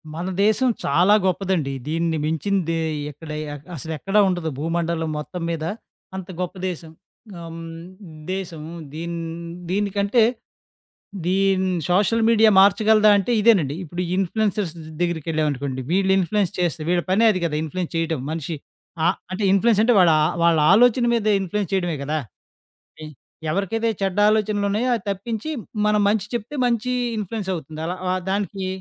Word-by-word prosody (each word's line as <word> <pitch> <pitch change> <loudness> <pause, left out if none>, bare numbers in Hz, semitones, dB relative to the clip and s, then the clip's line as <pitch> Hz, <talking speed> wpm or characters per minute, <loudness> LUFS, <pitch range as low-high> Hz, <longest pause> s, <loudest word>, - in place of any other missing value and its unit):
మన 170 +3 -4 0.2
దేశం 220 +5 +3 0.2
చాలా 175 +8 +4
గొప్పదండి. 185 -6 0
దీన్ని 165 +1 0
మించింది 165 +2 0 0.3
ఎక్కడ 150 +3 -12 0.5
అసలెక్కడ 160 +7 -5
ఉండదు. 175 -3 -1
భూమండలం 165 0 -1
మొత్తం 175 +4 -6
మీద 165 -2 -3 0.5
అంత 190 -2 -6
గొప్ప 180 +1 -4
దేశం. 165 -2 -8 0.5
ఆహ్, 165 0 -8 0.7
దేశం 180 -5 -5
హ్మ్ 170 0 -8
దీని 170 +2 -4 0.5
దీనికంటే 200 +3 +2 1.0
దీన్ని 190 0 +2
సోషల్ 210 +5 +2
మీడియా 225 -1 +6
మార్చగలదా? 215 +2 +5
అంటే, 200 +4 -1
ఇదేనండి. 190 -11 +4
ఇప్పుడు 175 +2 -5
ఇన్‌ఫ్లుయెన్సర్స్ 195 -1 0 0.3
దెగ్గరికెళ్ళాం 160 -3 0
అనుకోండి 135 -1 -4
వీళ్ళు 190 +1 +2
ఇన్‌ఫ్లుయెన్స్ 195 0 +1
చేస్తే 175 -2 -1
వీళ్ళ 175 0 +2
పనే 205 +5 +4
అది 185 - -2
గదా! 160 -3 -1
ఇన్‌ఫ్లుయెన్స్ 170 +3 -4
చేయడం. 165 -2 -1
మనిషి 160 0 -4 0.5
ఆ - - +5 0.2
అంటే 190 +3 -3
ఇన్‌ఫ్లుయెన్స్ 210 +2 +3
అంటే 240 +2 +4
ఆ - - +5
వాళ్ళ 175 -3 +6 0.3
వాళ్ళ 170 -2 +4
ఆలోచన 245 +3 +5
మీద 230 -3 0
ఇన్‌ఫ్లుయెన్స్ 195 0 -2
చేయడమే 175 -4 0
గదా! 155 +3 -1 0.8
ఐ - - -6 0.4
ఎవరికైతే 200 +6 -1
చెడ్డ 195 0 -1
ఆలోచనలున్నాయో 215 +2 +1
అది 220 - -8
తప్పించి 220 +7 -4 0.4
మనం 210 0 +3
మంచి 205 -1 +1
చెప్తే 240 +4 -4
మంచి 240 +1 0 0.3
ఇన్‌ఫ్లుయెన్స్ 205 -1 -4
అవుతుంది. 155 -1 -7
అలా 180 +2 -3 0.2
ఆ - - +1 0.2
దానికి 195 -1 -2
185 Hz, 140 wpm, -22 LUFS, 165-210 Hz, 1.0 s, మీడియా